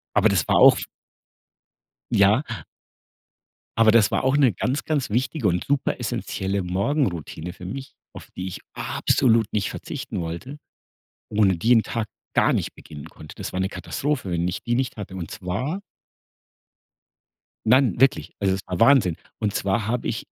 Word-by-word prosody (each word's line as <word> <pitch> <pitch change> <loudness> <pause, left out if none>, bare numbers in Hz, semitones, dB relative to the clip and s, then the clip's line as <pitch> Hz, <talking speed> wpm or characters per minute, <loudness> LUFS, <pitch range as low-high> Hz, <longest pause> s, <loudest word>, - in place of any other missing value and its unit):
Aber 110 - +5
das 95 -7 +1
war - - +3
auf - - +7 1.3
Ja. 100 +6 +4 1.4
Aber 115 -1 +6
das 110 -3 +5
war - - 0
auch 130 +2 +3
'ne 135 -5 +4
ganz, 125 +10 -2
ganz 145 -7 -1
wichtige 125 +2 0
und 90 0 0
super 140 -1 0
essenzielle 95 +1 -2
Morgenroutine 90 - -2
für 90 - -12
mich, 135 +8 -7 0.2
auf - - -12
die 90 - -4
ich 95 - -7
absolut 115 -4 +2
nicht 105 -2 0
verzichten 130 -9 -5
wollte, 85 - -6 0.7
ohne 100 -3 +3
die 115 +9 +2
'n 115 - +5
Tag 115 -1 -3 0.3
gar - - +4
nicht - - -2
beginnen 75 -2 -11
konnte. 75 - -12
Das - - -6
war 90 - -3
eine 95 0 0
Katastrophe, 95 - -3
wenn 85 0 0
ich 90 - -4
die 120 - 0
nicht 130 0 -1
hatte 100 -3 -7
und 85 -3 -6
zwar 125 - -3 1.9
Nein, 125 +1 +4
wirklich, 135 0 +3
also 95 -2 +1
es 95 - -3
war 90 -1 -4
Wahnsinn. 115 - +5 0.2
Und 105 -1 -1
zwar 100 +2 0
habe 120 +2 -1
ich - - -3
105 Hz, 160 wpm, -24 LUFS, 90-130 Hz, 1.9 s, auf